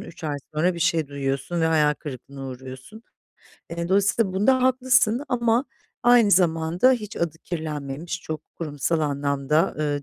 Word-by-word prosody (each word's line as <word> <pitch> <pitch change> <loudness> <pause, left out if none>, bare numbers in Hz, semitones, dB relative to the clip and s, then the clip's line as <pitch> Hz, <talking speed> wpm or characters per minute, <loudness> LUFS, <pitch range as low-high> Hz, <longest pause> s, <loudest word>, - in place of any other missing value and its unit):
3 165 -1 -11
ay 145 -2 -2 0.2
sonra 175 +4 +1
bir - - -6
şey 160 -4 +1
duyuyorsun 140 +4 -3
ve - - +2
hayal 150 -2 +3
kırıklığına 135 -1 -8
uğruyorsun. 130 - -10 0.7
E, 170 0 -4
dolayısıyla 200 +1 +2
bunda 250 +7 +3
haklısın 255 -1 +3
ama 235 +1 +1 0.4
aynı 240 -3 +5
zamanda, 175 +6 +3
hiç 215 -4 -4
adı 165 -2 -2
kirlenmemiş, 155 0 -5
çok 155 -1 -5
kurumsal 160 0 -2
anlamda, 140 +1 0
ııı, 145 -1 -1
165 Hz, 145 wpm, -24 LUFS, 145-205 Hz, 0.7 s, aynı